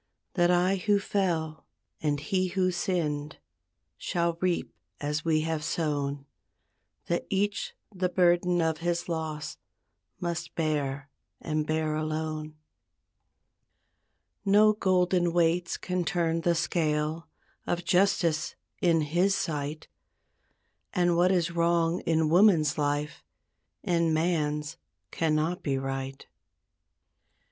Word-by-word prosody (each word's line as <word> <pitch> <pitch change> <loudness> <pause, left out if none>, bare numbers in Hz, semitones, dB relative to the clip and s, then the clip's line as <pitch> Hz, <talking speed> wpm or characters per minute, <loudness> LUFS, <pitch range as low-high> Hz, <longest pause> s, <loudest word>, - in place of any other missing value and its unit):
That 175 -2 +3
I 180 +2 +3
who 205 +2 +2
fell, 170 -6 -1 0.3
and 145 -2 0
he 185 +5 0
who 185 0 +1
sinned, 155 -5 -2 0.6
Shall 170 -1 0
reap 180 -2 0 0.3
as 150 +1 -2
we 160 -2 +2
have 160 -1 -2
sown; 145 -3 -2 0.8
That 170 - -2
each 200 +1 -1 0.2
the 185 -1 0
burden 175 -1 +3
of 160 -1 0
his 170 0 -1
loss 160 -3 -4 0.6
Must 175 -1 -4
bear 145 -3 -2 0.3
and 155 -1 -2
bear 155 0 0
alone. 155 0 -3 1.9
No 210 +2 +5
golden 180 -3 +2
weights 170 0 +1
can 180 -1 -2
turn 165 0 0
the 170 +1 +2
scale 155 -1 -1 0.4
Of 175 0 -1
justice 175 -4 +2 0.3
in 165 -2 +3
His 175 +6 +2
sight; 150 -3 -3 1.1
And 175 -1 +2
what 180 +2 +4
is 175 -2 +1
wrong 170 0 +2
in 160 -1 +3
woman's 170 -5 +5
life 145 0 -2 0.6
In 170 -4 +2
man's 155 -2 0 0.3
cannot 160 +2 0
be 135 -3 -1
right. 135 0 -4
165 Hz, 110 wpm, -28 LUFS, 155-180 Hz, 1.9 s, No